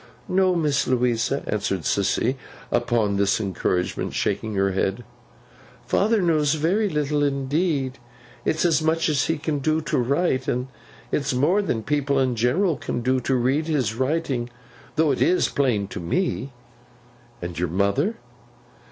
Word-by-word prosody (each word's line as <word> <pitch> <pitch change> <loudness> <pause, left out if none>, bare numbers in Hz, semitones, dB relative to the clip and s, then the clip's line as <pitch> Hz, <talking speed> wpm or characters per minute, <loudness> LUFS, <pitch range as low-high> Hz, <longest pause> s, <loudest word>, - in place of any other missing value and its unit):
'No, 185 0 +2
Miss 150 -4 +1
Louisa,' 125 +1 +1
answered 95 -4 -2
Sissy, 110 +6 +1 0.4
upon 105 -4 +1
this 100 +1 +2
encouragement, 90 -3 -2
shaking 105 +1 -1
her 95 0 +2
head; 95 +4 -1 0.8
'father 215 0 +2
knows 155 -3 +2
very 190 +8 +1
little 150 -2 0
indeed. 140 -1 0 0.4
It's 160 - +1
as 160 -3 +3
much 160 +1 +1
as 145 -4 +1
he 160 - 0
can 150 -1 -2
do 155 +3 +1
to 155 - -1
write; 130 +1 +1
and 125 +2 -1 0.4
it's 140 -3 0
more 170 +11 +3
than 115 - -2
people 145 0 0
in 130 -2 +1
general 145 - +1
can 120 - -3
do 130 +1 +2
to 130 +2 0
read 135 +6 +1
his 135 -8 0
writing. 130 -1 -1 0.5
Though 160 -2 +3
it's 175 +6 +2
plain 120 -8 +1
to - - -6
me.' 140 - -1 0.9
'Your 85 0 -2
mother? 100 - +1
135 Hz, 145 wpm, -23 LUFS, 120-160 Hz, 0.9 s, as